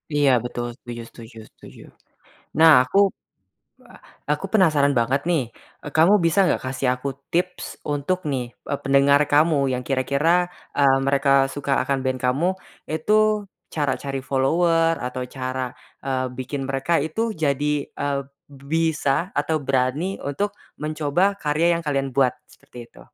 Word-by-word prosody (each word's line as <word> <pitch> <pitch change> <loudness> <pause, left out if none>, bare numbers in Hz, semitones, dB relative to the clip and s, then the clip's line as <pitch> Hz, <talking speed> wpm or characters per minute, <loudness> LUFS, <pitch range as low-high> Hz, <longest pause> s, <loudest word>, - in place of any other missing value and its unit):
Iya, 145 -2 +4
betul 120 0 -4
setuju 120 -1 -8
setuju 115 -1 -13
setuju. - - -15 0.8
Nah, 160 0 +8
aku 160 - -2 1.3
aku - - -1
penasaran 155 -8 +4
banget 130 +4 +1
nih, 160 -6 +2 0.5
kamu 170 +6 +6
bisa 165 +4 +2
nggak - - 0
kasih 130 0 -2
aku 140 +2 -5 0.2
tips 180 +1 -1 0.3
untuk 145 +6 -1
nih, 125 -2 -1 0.3
eee, 140 - -1
pendengar 140 +1 +4
kamu, 155 +1 +4 0.2
yang 125 0 -3
kira-kira, 140 +4 0 0.5
eee, 135 -1 +5
mereka 140 0 +2 0.2
suka 140 -1 -3
akan 135 0 0
band 130 0 0
kamu. 140 +8 +2 0.4
Itu, 160 +7 0 0.6
cara 145 -3 0
cari 135 -1 -3
follower, 165 +5 +2
atau 125 0 -4
cara, 130 0 -3 0.4
eee, 130 -1 -1
bikin 135 +2 -4
mereka 135 +5 -2
itu 160 +8 -5 0.2
jadi, 145 -1 0 0.2
eee, 140 -1 -2 0.3
bisa 155 +3 -1
atau 150 +2 0
berani 135 +8 0
untuk 200 +9 -1 0.3
mencoba 155 +6 0
karya 165 +3 +2
yang 170 - -5
kalian 140 -2 -1
buat? 130 -2 +4 0.2
Seperti 125 - -16
itu. - - -17
140 Hz, 135 wpm, -22 LUFS, 135-160 Hz, 1.3 s, Nah